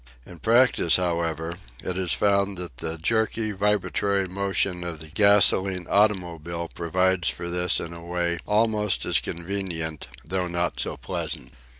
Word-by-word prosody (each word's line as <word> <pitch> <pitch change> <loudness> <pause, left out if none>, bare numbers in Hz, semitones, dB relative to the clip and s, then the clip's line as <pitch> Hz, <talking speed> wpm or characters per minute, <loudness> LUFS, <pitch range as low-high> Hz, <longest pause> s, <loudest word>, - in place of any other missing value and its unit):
In 85 - -12
practice, 115 -6 +4
however, 85 -2 -1 0.3
it 90 - -3
is 90 -3 0
found 100 -1 +2
that 85 -8 -7
the 80 +5 -4
jerky 110 +4 0
vibratory 100 -1 0
motion 95 -1 -1
of 85 -3 -6
the 80 - -10
gasoline 95 0 +4
automobile 85 -5 0
provides 90 +1 +1
for 85 0 -5
this 90 0 +1
in 85 - -6
a 85 0 -10
way 85 0 -1
almost 105 -1 +1
as - - +2
convenient, 85 -4 -4 0.2
although 90 +3 -2
not 85 0 -2
so - - -2
pleasant. - - -5
90 Hz, 140 wpm, -25 LUFS, 85-100 Hz, 0.3 s, practice